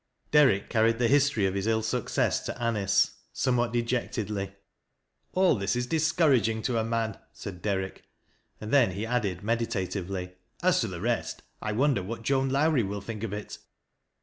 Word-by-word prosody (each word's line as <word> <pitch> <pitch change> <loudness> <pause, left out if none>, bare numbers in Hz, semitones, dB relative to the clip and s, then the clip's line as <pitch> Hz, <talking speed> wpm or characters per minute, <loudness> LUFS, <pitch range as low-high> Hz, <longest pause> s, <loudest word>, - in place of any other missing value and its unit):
Derrick 130 -10 +5
carried 115 0 +2
the 120 0 +2
history 140 -6 +3
of 95 - 0
his 100 +2 -2
ill 110 -1 +1
success 120 +1 0
to - - -2
Anicc, 105 -5 +1 0.2
somewhat 120 -3 +1
dejectedly. 115 -4 -2 0.4
" - - -48
All 185 0 +5
this 100 0 -1
is 125 0 0
discouraging 135 - +2
to 120 -3 0
a - - +1
man," 115 -2 -2
said 90 -3 -8
Dei'rick, 95 -2 -2 0.6
and 110 - -6
then 125 -10 +5
he 100 +4 -3
added 105 -6 -1
meditatively, 100 -5 -2
" - - -24
As - - +4
to - - 0
the - - -6
rest, - - -2 0.2
I 110 - -2
wonder 130 -2 +2
what 115 +5 -6
Joan 135 +2 +1
Lowrie 145 0 +3
will 100 -1 -3
think 110 +1 -6
of 115 -3 -3
it." 105 0 -6
115 Hz, 175 wpm, -28 LUFS, 100-125 Hz, 0.6 s, Derrick